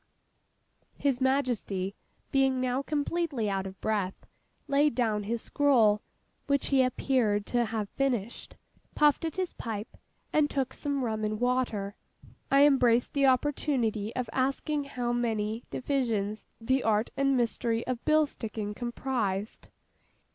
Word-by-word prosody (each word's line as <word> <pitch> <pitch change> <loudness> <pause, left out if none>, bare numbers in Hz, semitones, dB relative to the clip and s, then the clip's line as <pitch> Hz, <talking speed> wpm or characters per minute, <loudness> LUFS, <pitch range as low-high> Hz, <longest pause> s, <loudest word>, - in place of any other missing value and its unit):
His 270 -3 0
Majesty, 245 -8 0 0.4
being 270 -1 +3
now 255 +1 0
completely 290 -5 -1
out 195 0 -2
of 190 0 -10
breath, 205 -4 -2 0.4
laid 285 -1 +3
down 220 -4 0
his 230 +2 -2
scroll 235 -8 +3 0.5
(which 280 -1 +1
he 270 -2 +4
appeared 245 -5 +1
to 240 -1 +1
have 220 -2 -3
finished), 240 -3 -2 0.4
puffed 300 +2 +3
at 320 - -3
his 370 -2 -2
pipe, 220 -2 -6 0.4
and 300 -1 +3
took 270 -3 -1
some 285 -2 -2
rum 220 -1 -2
and 215 0 -1
water. 245 -5 0 0.6
I 275 +1 +6
embraced 245 -4 +3
the 275 -1 +3
opportunity 250 -5 +1
of 250 -2 -2
asking 275 +3 0
how 245 -3 -2
many 225 -1 -1
divisions 225 -7 -1
the 260 +4 +1
art 220 0 +1
and 275 -1 +2
mystery 230 -1 0
of 250 -2 -3
bill 310 0 +4
sticking 215 -6 -5
comprised? 235 -4 -3
245 Hz, 135 wpm, -29 LUFS, 215-275 Hz, 0.6 s, I